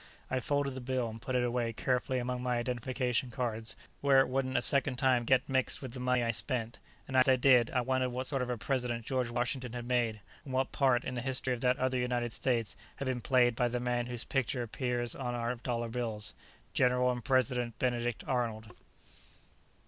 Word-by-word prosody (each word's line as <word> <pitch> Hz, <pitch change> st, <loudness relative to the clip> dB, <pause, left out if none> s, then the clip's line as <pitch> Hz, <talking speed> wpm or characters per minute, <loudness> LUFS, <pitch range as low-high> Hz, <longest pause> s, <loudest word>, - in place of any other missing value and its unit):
I 130 Hz, -, +1 dB
folded 145 Hz, +1 st, 0 dB
the 130 Hz, -, -6 dB
bill 125 Hz, -1 st, -1 dB
and 110 Hz, 0 st, -9 dB
put 130 Hz, +1 st, -3 dB
it 125 Hz, -, +3 dB
away 120 Hz, -1 st, -1 dB
carefully 130 Hz, +2 st, 0 dB
among 125 Hz, 0 st, -2 dB
my 125 Hz, -1 st, 0 dB
identification 125 Hz, +1 st, -1 dB
cards, 115 Hz, -3 st, -3 dB, 0.2 s
where 140 Hz, -1 st, +5 dB
it 135 Hz, -, +3 dB
wouldn't 130 Hz, 0 st, 0 dB
a -, -, +2 dB
second 140 Hz, -1 st, +5 dB
time 125 Hz, -2 st, +2 dB
get 130 Hz, +1 st, +3 dB
mixed 130 Hz, -2 st, +1 dB
with 130 Hz, -4 st, -7 dB
the 130 Hz, -, -6 dB
money 125 Hz, -1 st, +1 dB
I 115 Hz, -, +1 dB
spent, 115 Hz, 0 st, -2 dB, 0.3 s
and 135 Hz, -, -5 dB
as 130 Hz, +1 st, +5 dB
I 130 Hz, -, +7 dB
did, 125 Hz, -2 st, +5 dB
I 125 Hz, -, +1 dB
wondered 130 Hz, +1 st, 0 dB
what 125 Hz, +1 st, -3 dB
sort 135 Hz, -1 st, -1 dB
of 125 Hz, -, -2 dB
a 125 Hz, -, -1 dB
President 120 Hz, 0 st, -2 dB
George 130 Hz, -2 st, 0 dB
Washington 120 Hz, +1 st, -2 dB
had 120 Hz, -1 st, -5 dB
made, 120 Hz, -3 st, +1 dB, 0.2 s
and 135 Hz, -3 st, -5 dB
what 130 Hz, 0 st, +1 dB
part, 130 Hz, -3 st, +2 dB
in 130 Hz, -, -3 dB
the 120 Hz, -, -3 dB
history 130 Hz, 0 st, 0 dB
of 120 Hz, -, -5 dB
that 125 Hz, 0 st, +3 dB
other 130 Hz, 0 st, 0 dB
United 120 Hz, -2 st, -1 dB
States, 120 Hz, -5 st, 0 dB, 0.2 s
had 140 Hz, -, -5 dB
been 130 Hz, -2 st, -1 dB
played 125 Hz, -2 st, +3 dB
by 125 Hz, -, +2 dB
the 120 Hz, +1 st, -2 dB
man 120 Hz, 0 st, -1 dB
whose 120 Hz, -2 st, -3 dB
picture 130 Hz, -2 st, -1 dB
appears 120 Hz, 0 st, -2 dB
on 125 Hz, -2 st, -3 dB
our 120 Hz, 0 st, -1 dB
dollar 120 Hz, -1 st, -3 dB
bills 110 Hz, -3 st, -2 dB, 0.4 s
General 125 Hz, 0 st, +3 dB
and 120 Hz, -1 st, -4 dB
President 125 Hz, -3 st, +1 dB
Benedict 120 Hz, -2 st, -1 dB
Arnold. 115 Hz, -4 st, -1 dB
THE 110 Hz, -, -15 dB
END. -, -, -17 dB
125 Hz, 215 wpm, -32 LUFS, 120-130 Hz, 0.4 s, I